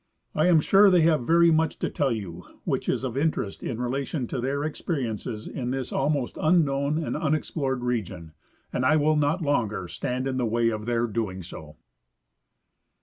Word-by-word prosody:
I 155 Hz, +3 st, +2 dB
am 165 Hz, -3 st, +5 dB
sure 200 Hz, +5 st, +6 dB
they 180 Hz, -2 st, +5 dB
have 155 Hz, -6 st, +2 dB
very 170 Hz, 0 st, +5 dB
much 160 Hz, 0 st, +1 dB
to -, -, -1 dB
tell 140 Hz, -3 st, 0 dB
you 90 Hz, -6 st, -5 dB, 0.2 s
which -, -, -2 dB
is -, -, 0 dB
of 130 Hz, -2 st, -3 dB
interest 140 Hz, -8 st, -1 dB
in 115 Hz, -, -4 dB
relation 130 Hz, +2 st, -2 dB
to 130 Hz, -, -3 dB
their 140 Hz, +3 st, -1 dB
experiences 125 Hz, -, -3 dB
in 125 Hz, -3 st, -4 dB
this 130 Hz, -1 st, -3 dB
almost 140 Hz, -2 st, -1 dB
unknown 150 Hz, -3 st, +2 dB
and -, -, -3 dB
unexplored 150 Hz, -4 st, -1 dB
region, 95 Hz, -9 st, -3 dB, 0.4 s
and 125 Hz, -, 0 dB
I 130 Hz, +4 st, +4 dB
will 155 Hz, 0 st, +3 dB
not 150 Hz, +4 st, +1 dB
longer 110 Hz, -, 0 dB
stand 125 Hz, +8 st, -3 dB
in 130 Hz, -1 st, -2 dB
the 125 Hz, -, 0 dB
way 115 Hz, +1 st, +2 dB
of 110 Hz, 0 st, -4 dB
their 120 Hz, -1 st, +1 dB
doing 105 Hz, -5 st, -3 dB
so. 75 Hz, -3 st, -10 dB
135 Hz, 180 wpm, -26 LUFS, 115-155 Hz, 0.4 s, sure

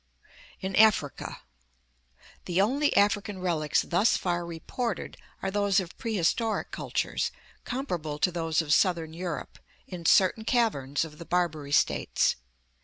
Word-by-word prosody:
In 190 Hz, 0 st, -3 dB
Africa. 215 Hz, -10 st, +2 dB, 0.5 s
— -, -, -28 dB
The 175 Hz, +1 st, 0 dB
only 275 Hz, +9 st, +2 dB
African 205 Hz, 0 st, +2 dB
relics 165 Hz, -5 st, +1 dB
thus 185 Hz, +6 st, +2 dB
far 175 Hz, -1 st, -1 dB
reported 185 Hz, +6 st, -4 dB, 0.3 s
are 195 Hz, -, -1 dB
those 200 Hz, 0 st, +2 dB
of 180 Hz, -2 st, -6 dB
prehistoric 220 Hz, +1 st, 0 dB
cultures, -, -, -2 dB, 0.4 s
comparable 175 Hz, -, -3 dB
to 180 Hz, +5 st, +2 dB
those 165 Hz, -2 st, 0 dB
of 150 Hz, -1 st, +1 dB
southern 165 Hz, -3 st, +2 dB
Europe, 170 Hz, -1 st, -5 dB, 0.3 s
in 175 Hz, -3 st, -5 dB
certain 195 Hz, +3 st, +4 dB
caverns 165 Hz, -, +1 dB
of 150 Hz, -1 st, -12 dB
the 170 Hz, -, -8 dB
Barbary 160 Hz, -5 st, -1 dB
States. -, -, +2 dB
180 Hz, 130 wpm, -28 LUFS, 160-205 Hz, 0.5 s, certain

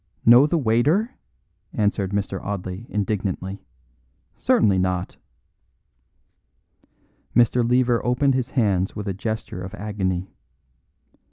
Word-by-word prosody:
"Know 120 Hz, +5 st, +8 dB
the 170 Hz, -, +1 dB
waiter?" 145 Hz, -, +2 dB, 0.6 s
answered 100 Hz, -2 st, 0 dB
Mr. 100 Hz, -1 st, -2 dB
Audley 100 Hz, +2 st, -5 dB
indignantly. 100 Hz, -2 st, -3 dB, 0.8 s
"Certainly 100 Hz, -4 st, +3 dB
not!" 90 Hz, -1 st, -2 dB, 2.2 s
Mr. 120 Hz, 0 st, +4 dB
Lever 120 Hz, 0 st, +2 dB
opened 125 Hz, +3 st, +2 dB
his 130 Hz, -1 st, -1 dB
hands 100 Hz, -7 st, 0 dB
with 105 Hz, -1 st, -5 dB
a 100 Hz, -, -1 dB
gesture 110 Hz, -2 st, -5 dB
of 95 Hz, 0 st, -7 dB
agony. 95 Hz, -2 st, -3 dB
105 Hz, 100 wpm, -23 LUFS, 95-120 Hz, 2.2 s, Know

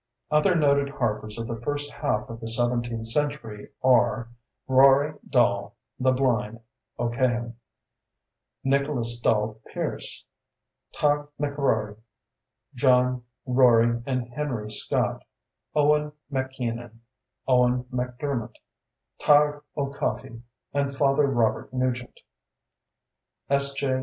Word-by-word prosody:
Other 150 Hz, +5 st, +4 dB
noted 140 Hz, -3 st, +3 dB
harpers 110 Hz, -5 st, -2 dB
of 115 Hz, -, -4 dB
the 115 Hz, -1 st, -5 dB
first 145 Hz, +3 st, -3 dB
half 105 Hz, -, -1 dB
of 115 Hz, 0 st, -8 dB
the 115 Hz, -, -6 dB
seventeenth 120 Hz, -1 st, 0 dB
century 115 Hz, -4 st, -2 dB
are: 120 Hz, -2 st, +3 dB, 0.4 s
Rory 135 Hz, +3 st, +5 dB, 0.2 s
dall 100 Hz, -4 st, +2 dB, 0.2 s
("the 130 Hz, 0 st, +3 dB
blind") 120 Hz, -4 st, 0 dB, 0.4 s
O'Cahan; 120 Hz, 0 st, -1 dB, 1.1 s
Nicholas 135 Hz, -4 st, 0 dB
dall 110 Hz, -1 st, +1 dB
Pierce; -, -, -4 dB, 0.7 s
Tadhg 145 Hz, 0 st, +1 dB
MacRory; 135 Hz, -8 st, 0 dB, 0.8 s
John, 125 Hz, -1 st, +2 dB, 0.2 s
Rory, 120 Hz, -2 st, +4 dB
and 125 Hz, -2 st, -1 dB
Henry 120 Hz, -7 st, -3 dB
Scott; -, -, -1 dB, 0.5 s
Owen 150 Hz, 0 st, +3 dB, 0.2 s
MacKeenan; 120 Hz, -4 st, -4 dB, 0.5 s
Owen 125 Hz, -1 st, +3 dB
MacDermot; 125 Hz, -1 st, -3 dB, 0.6 s
Tadhg 145 Hz, 0 st, +4 dB, 0.2 s
O'Coffey; 120 Hz, -5 st, -3 dB, 0.3 s
and 140 Hz, -1 st, -1 dB
Father 140 Hz, 0 st, +3 dB
Robert 115 Hz, -5 st, 0 dB
Nugent, 125 Hz, -1 st, -2 dB, 1.3 s
S.J. 140 Hz, -1 st, +1 dB
125 Hz, 95 wpm, -26 LUFS, 115-140 Hz, 1.3 s, Rory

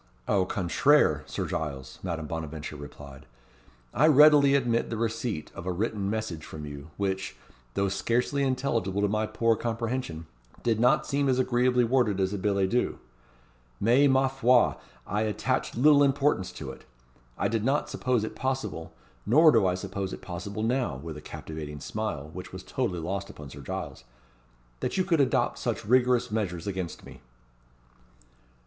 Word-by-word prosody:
"Au 95 Hz, -3 st, +2 dB
contraire, 90 Hz, -3 st, +3 dB
Sir -, -, -3 dB
Giles," 70 Hz, -4 st, -5 dB
Madame 85 Hz, -4 st, -3 dB
Bonaventure 80 Hz, -1 st, -5 dB
replied. 70 Hz, -1 st, -11 dB, 0.7 s
"I 150 Hz, +7 st, +4 dB
readily 145 Hz, -2 st, +7 dB
admit 120 Hz, -4 st, +1 dB
the 115 Hz, -, -3 dB
receipt 115 Hz, -5 st, -2 dB
of 85 Hz, -, -8 dB
a -, -, +1 dB
written 100 Hz, +1 st, -2 dB
message 105 Hz, -7 st, -3 dB
from 75 Hz, -2 st, -8 dB
you, 70 Hz, +1 st, -9 dB
which, 95 Hz, -1 st, -2 dB, 0.4 s
though 100 Hz, -, +1 dB
scarcely 120 Hz, +8 st, 0 dB
intelligible 115 Hz, -7 st, 0 dB
to -, -, +4 dB
my 110 Hz, +1 st, 0 dB
poor 115 Hz, 0 st, +2 dB
comprehension, 115 Hz, -7 st, -3 dB, 0.4 s
did 115 Hz, -2 st, +1 dB
not 125 Hz, +2 st, +4 dB
seem 140 Hz, -1 st, 0 dB
as 130 Hz, -, +2 dB
agreeably 125 Hz, -1 st, +2 dB
worded 115 Hz, -5 st, +2 dB
as 95 Hz, +1 st, 0 dB
a 100 Hz, -, -3 dB
billet 100 Hz, -1 st, +1 dB
doux. 125 Hz, -, 0 dB, 0.8 s
Mais, 125 Hz, +6 st, +4 dB
ma 130 Hz, 0 st, +4 dB
foi! 125 Hz, -, +3 dB, 0.3 s
I 105 Hz, +3 st, -1 dB
attached 110 Hz, +1 st, -1 dB
little 145 Hz, +3 st, +6 dB
importance 140 Hz, -8 st, +2 dB
to -, -, -6 dB
it. -, -, -14 dB, 0.5 s
I -, -, +1 dB
did 115 Hz, -2 st, -1 dB
not 135 Hz, +5 st, +1 dB
suppose 125 Hz, -4 st, 0 dB
it 110 Hz, -, -5 dB
possible 105 Hz, -12 st, -3 dB, 0.3 s
nor 155 Hz, +9 st, +6 dB
do 110 Hz, -7 st, +4 dB
I 90 Hz, -, +1 dB
suppose 95 Hz, 0 st, -4 dB
it -, -, -7 dB
possible 100 Hz, +4 st, -5 dB
now" 120 Hz, -, 0 dB
with 80 Hz, +4 st, -7 dB
a 75 Hz, -, -9 dB
captivating 75 Hz, -2 st, -7 dB
smile, 75 Hz, -, -4 dB
which 90 Hz, +1 st, -8 dB
was 95 Hz, 0 st, -8 dB
totally 120 Hz, -10 st, -2 dB
lost 100 Hz, +4 st, -3 dB
upon 75 Hz, -8 st, -10 dB
Sir 70 Hz, -, -10 dB
Giles 65 Hz, -, -6 dB, 0.8 s
"that -, -, -2 dB
you 185 Hz, -, +3 dB
could 170 Hz, -5 st, +2 dB
adopt 130 Hz, -3 st, +1 dB
such -, -, -2 dB
rigorous 125 Hz, 0 st, +3 dB
measures 90 Hz, -6 st, -2 dB
against 95 Hz, -4 st, -4 dB
me." -, -, -13 dB
105 Hz, 165 wpm, -28 LUFS, 90-125 Hz, 0.8 s, readily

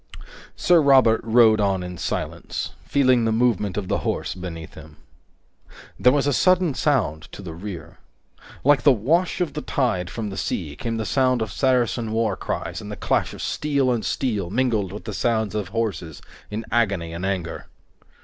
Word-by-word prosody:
Sir 175 Hz, -2 st, +4 dB
Robert 130 Hz, -6 st, +5 dB
rode 110 Hz, -2 st, +5 dB
on 95 Hz, -2 st, +1 dB
in 90 Hz, 0 st, -6 dB
silence, -, -, -4 dB, 0.2 s
feeling 130 Hz, -4 st, +3 dB
the 115 Hz, -, +1 dB
movement 110 Hz, -4 st, +1 dB
of 100 Hz, -3 st, -3 dB
the -, -, 0 dB
horse -, -, -2 dB
beneath 85 Hz, -3 st, -8 dB
him. 80 Hz, -1 st, -13 dB, 1.0 s
There 125 Hz, -, +6 dB
was 140 Hz, 0 st, +1 dB
a 145 Hz, -, +2 dB
sudden 180 Hz, +4 st, +3 dB
sound 110 Hz, -, 0 dB
to 100 Hz, -, -9 dB
the 85 Hz, -3 st, -7 dB
rear. 85 Hz, -2 st, -8 dB, 0.6 s
Like 145 Hz, 0 st, +4 dB
a -, -, +9 dB
wash 160 Hz, -, +1 dB
of 160 Hz, -5 st, -1 dB
the 150 Hz, -, -4 dB
tide 110 Hz, -14 st, -1 dB
from 110 Hz, -3 st, -5 dB
the 95 Hz, -, -7 dB
sea 75 Hz, -7 st, -3 dB
came 115 Hz, +8 st, -3 dB
the 110 Hz, -, -2 dB
sound 130 Hz, -2 st, +2 dB
of 110 Hz, -, -6 dB
Saracen 120 Hz, -3 st, +1 dB
war 110 Hz, -3 st, +1 dB
cries -, -, -4 dB
and -, -, -8 dB
the -, -, -4 dB
clash -, -, 0 dB
of -, -, -7 dB
steel 140 Hz, -4 st, 0 dB
on 120 Hz, -2 st, 0 dB
steel 105 Hz, -10 st, -1 dB
mingled 110 Hz, -4 st, 0 dB
with -, -, -8 dB
the -, -, -5 dB
sounds 110 Hz, -3 st, 0 dB
of 105 Hz, -3 st, -2 dB
horses 95 Hz, -7 st, -3 dB, 0.3 s
in 110 Hz, +2 st, -5 dB
agony 100 Hz, -8 st, 0 dB
and 85 Hz, +2 st, -6 dB
anger. 95 Hz, -4 st, -3 dB
110 Hz, 180 wpm, -23 LUFS, 95-130 Hz, 1.0 s, a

